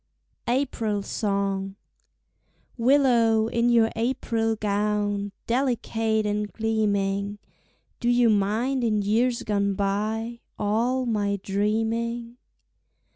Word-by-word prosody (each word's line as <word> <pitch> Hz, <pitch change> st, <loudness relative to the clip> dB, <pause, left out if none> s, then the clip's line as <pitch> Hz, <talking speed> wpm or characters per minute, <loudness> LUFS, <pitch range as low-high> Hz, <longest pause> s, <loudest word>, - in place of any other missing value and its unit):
April 235 Hz, -5 st, 0 dB
Song 195 Hz, -2 st, -2 dB, 1.0 s
Willow, 235 Hz, -3 st, +4 dB
in 235 Hz, +1 st, +1 dB
your 230 Hz, -2 st, +4 dB
April 225 Hz, -1 st, 0 dB
gown 205 Hz, -1 st, -1 dB
Delicate 225 Hz, -3 st, 0 dB
and 210 Hz, 0 st, -1 dB
gleaming, 205 Hz, -2 st, 0 dB, 0.6 s
Do 240 Hz, -, 0 dB
you 240 Hz, -1 st, +4 dB
mind 220 Hz, +6 st, +1 dB
in 215 Hz, -3 st, +1 dB
years 235 Hz, +4 st, +1 dB
gone 200 Hz, -2 st, 0 dB
by 215 Hz, +4 st, -2 dB, 0.2 s
All 235 Hz, +5 st, 0 dB
my 205 Hz, -3 st, 0 dB
dreaming? 225 Hz, +4 st, -1 dB
220 Hz, 90 wpm, -25 LUFS, 205-235 Hz, 1.0 s, Willow